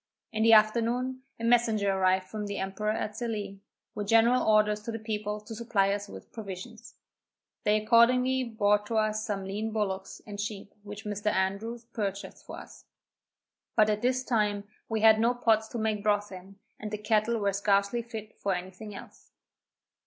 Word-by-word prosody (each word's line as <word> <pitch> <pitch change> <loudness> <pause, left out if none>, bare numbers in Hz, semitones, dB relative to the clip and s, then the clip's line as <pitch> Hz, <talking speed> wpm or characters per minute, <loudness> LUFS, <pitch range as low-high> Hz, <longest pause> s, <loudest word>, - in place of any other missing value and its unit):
In 220 -1 -2
the 225 0 +6
afternoon, 235 +4 +3 0.2
a - - -7
messenger 230 -4 +3
arrived 185 0 +2
from 210 +2 -5
the 200 0 -4
emperor 195 +2 -2
at 215 -1 -2
Sallee, 215 -4 -4 0.3
with 205 -1 -4
general 230 +3 +5
orders 210 -1 +3
to 230 - -5
the 225 - -4
people 210 -1 -3
to 220 +2 -9
supply 210 -3 +1
us 205 0 -4
with - - -11
provisions. 195 -6 -9 0.7
They 210 +1 +4
accordingly 250 +4 +4
brought 210 -3 +1
us 215 -1 0
some 195 -2 -3
lean 210 +3 -3
bullocks 195 -3 -3
and 205 -1 -5
sheep 205 -1 -6
which 205 +1 -9
Mr. 210 0 -4
Andrews 210 +5 -2
purchased 200 -4 -5
for - - -7
us; - - -13 0.9
but 215 0 +5
at 210 0 -1
this 255 +1 +1
time 210 -5 0 0.3
we 220 -1 -1
had 220 0 +7
no 235 +2 +2
pots 220 -2 +2
to 240 - -6
make 220 -2 -1
broth 205 0 +1
in, 190 +1 -11 0.2
and 215 - -5
the 210 - -3
cattle 215 +2 +1
were 200 -2 0
scarcely 200 +3 +1
fit 220 -2 -8
for 195 -2 0
any 180 +1 -6
thing 205 +2 -10
else. - - -13
215 Hz, 175 wpm, -29 LUFS, 200-225 Hz, 0.9 s, had